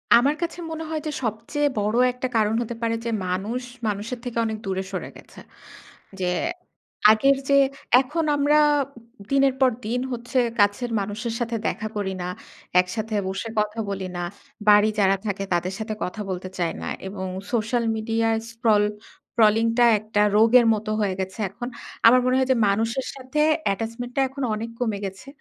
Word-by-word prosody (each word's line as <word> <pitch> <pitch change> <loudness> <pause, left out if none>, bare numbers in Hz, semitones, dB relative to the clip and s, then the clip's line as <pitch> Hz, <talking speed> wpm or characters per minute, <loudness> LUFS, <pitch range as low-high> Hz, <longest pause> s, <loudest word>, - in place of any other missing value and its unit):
আমার 270 +5 +4
কাছে 340 0 -2
মনে 320 0 -4
হয় 315 -1 -2
যে - - -1
সবচেয়ে 230 +7 -1
বড় 210 +2 0 0.2
একটা 250 +1 -3
কারণ 215 0 +2
হতে 235 0 -4
পারে 230 0 0
যে - - -1 0.2
মানুষ 200 +7 -2 0.3
মানুষের 215 +4 -3
থেকে 245 -2 -5
অনেক 220 -1 -2
দূরে 190 0 -2
সরে 185 - -4
গেছে। - - -15 0.8
যে 185 - -1 0.9
আগের 275 +5 +4
যে 280 - +5 0.5
এখন 300 +5 -2
আমরা 290 +1 +3 0.7
দিনের 275 -1 +4
পর 260 -1 +5
দিন 235 +3 -1
হচ্ছে 245 +2 -1 0.2
কাছের 205 +4 +2
মানুষের 210 +4 -3
সাথে 235 -1 -2
দেখা 215 - -2
করি 200 -2 -2
না, 180 - -3 0.5
একসাথে 215 +4 -1
বসে 195 +4 -3
কথা 210 +1 -1
বলি 195 -1 -3
না। 175 - -3 0.5
বাড়ি 210 +1 +7
যারা 195 -1 +4
থাকে 195 -1 -2
তাদের 180 +2 0
সাথে 220 0 -3
কথা 195 +4 -4
বলতে 185 0 -4
চাই 170 -2 0
না - - -5 0.2
এবং 190 -1 -5 0.3
সোশ্যাল 235 0 0
মিডিয়ায় 225 0 0
স্ক্রল 225 -3 +3 0.5
স্ক্রলিংটা 230 +2 +4
একটা 215 0 -1
রোগের 230 +3 +6
মতো 215 0 -3
হয়ে 200 -2 +1
গেছে 190 +2 -4
এখন। 240 +6 -7 0.4
আমার 250 +2 +7
মনে 255 0 +3
হয় 260 -1 +2
যে - - +4
মানুষের 225 +6 0
সাথে 265 +3 -2 0.3
attachment 230 +4 -5
টা - - +1
এখন 270 +1 -5
অনেক 225 +2 -5
কমে 225 -5 0
গেছে। 195 +5 -8
225 Hz, 170 wpm, -24 LUFS, 205-245 Hz, 0.9 s, বাড়ি